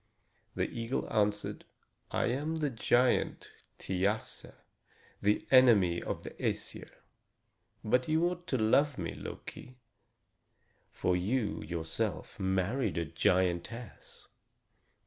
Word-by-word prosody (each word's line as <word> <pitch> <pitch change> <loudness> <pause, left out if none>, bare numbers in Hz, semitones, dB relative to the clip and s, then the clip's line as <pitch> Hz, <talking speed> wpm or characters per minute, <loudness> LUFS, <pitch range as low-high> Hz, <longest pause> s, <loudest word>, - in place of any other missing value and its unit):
The - - 0
eagle 115 +2 -3
answered: 105 -1 0 0.5
"I - - 0
am 145 +6 -1
the 150 -3 -1
giant 120 +2 +2 0.3
Thiasse, 100 +4 -1 0.7
the 105 +1 +2
enemy 110 -10 +6
of - - -4
the - - -6
Æsir. - - -3 0.9
But 125 +4 +2
you 160 +2 +3
ought 175 0 -5
to 130 - 0
love 130 +6 +3
me, 85 -3 -3
Loki, 125 0 -9 1.1
for 90 - 0
you 105 +5 0
yourself 80 -2 -3
married 95 +4 0
a 85 - 0
giantess." 90 +7 -1
110 Hz, 105 wpm, -32 LUFS, 95-130 Hz, 1.1 s, enemy